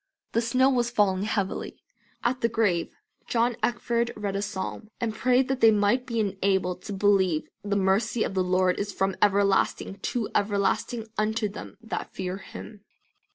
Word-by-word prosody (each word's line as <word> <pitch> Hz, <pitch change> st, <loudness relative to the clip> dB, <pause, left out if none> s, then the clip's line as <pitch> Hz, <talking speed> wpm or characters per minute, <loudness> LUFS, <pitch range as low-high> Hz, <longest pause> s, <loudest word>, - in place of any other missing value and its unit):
The 230 Hz, -, +2 dB
snow 255 Hz, +3 st, +3 dB
was 240 Hz, -2 st, +1 dB
falling 200 Hz, -4 st, +2 dB
heavily. 200 Hz, -3 st, -2 dB, 0.5 s
At 255 Hz, +1 st, 0 dB
the 230 Hz, -, +2 dB
grave 205 Hz, -7 st, +1 dB, 0.4 s
John 235 Hz, 0 st, +1 dB
Eckford 235 Hz, +1 st, 0 dB
read 205 Hz, -2 st, -3 dB
a 200 Hz, -, -1 dB
psalm, 205 Hz, +1 st, -5 dB
and 225 Hz, -2 st, -1 dB
prayed, 255 Hz, +3 st, +2 dB
"that 265 Hz, -1 st, -2 dB
they 225 Hz, -, +8 dB
might 215 Hz, +5 st, +2 dB
be 230 Hz, -3 st, -1 dB
enabled 190 Hz, -3 st, 0 dB
to 205 Hz, -, -4 dB
believe, 190 Hz, -5 st, +2 dB, 0.2 s
the 205 Hz, 0 st, -1 dB
mercy 200 Hz, +4 st, +2 dB
of -, -, -3 dB
the 190 Hz, -1 st, +1 dB
Lord 185 Hz, 0 st, +2 dB
is 205 Hz, 0 st, -2 dB
from 195 Hz, 0 st, -1 dB
everlasting 200 Hz, -1 st, +2 dB
to 230 Hz, +2 st, -2 dB
everlasting 205 Hz, +3 st, 0 dB
unto 215 Hz, +1 st, +1 dB
them 205 Hz, -, -9 dB
that 225 Hz, -, -5 dB
fear 185 Hz, 0 st, -3 dB
Him." 205 Hz, +1 st, -10 dB
205 Hz, 165 wpm, -26 LUFS, 195-230 Hz, 0.5 s, they